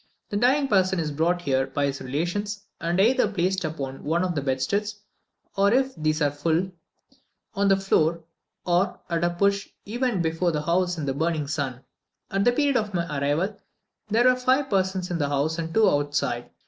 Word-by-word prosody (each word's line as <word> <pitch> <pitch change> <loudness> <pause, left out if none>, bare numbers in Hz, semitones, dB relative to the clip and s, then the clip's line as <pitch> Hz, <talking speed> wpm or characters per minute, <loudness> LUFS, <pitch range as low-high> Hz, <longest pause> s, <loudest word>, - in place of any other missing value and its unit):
The 205 - 0
dying 265 +5 +3
person 190 -4 +2
is 155 -2 -2
brought 170 +4 0
here 135 -2 +1
by 140 +1 -1
his 140 -1 -3
relations, 185 +10 -3 0.2
and 170 +2 -1
either 240 +3 +4
placed 185 -1 0
upon 140 -4 -5
one 170 +4 +1
of 180 -1 -1
the 145 - -1
bedsteads, 145 +11 -1 0.6
or, 200 +1 +3
if 265 +2 +2
these 155 0 0
are 145 - +2
all - - -16
full, 165 +5 0 0.8
on 200 -1 +1
the 195 0 +5
floor, 170 -4 +1 0.4
or, 180 +2 +1
at 170 0 0
a 175 - +3
push, 200 +3 0 0.2
even 235 -3 -1
before 165 +2 0
the 150 -2 -2
house 180 +2 +1
in 155 - -3
the 135 - -1
burning 160 +1 -1
sun. 140 -3 -3 0.5
At 195 0 +1
the 245 - +5
period 280 +1 +2
of 210 -4 -2
my 170 -1 0
arrival, 155 +9 0 0.5
there 225 +3 +3
were 255 0 +5
five 260 +2 +1
persons 190 -1 0
in 170 - -1
the 145 -2 0
house 145 +4 0
and 165 0 -3
two 220 +3 +4
outside. 145 -6 0
175 Hz, 195 wpm, -25 LUFS, 150-200 Hz, 0.8 s, the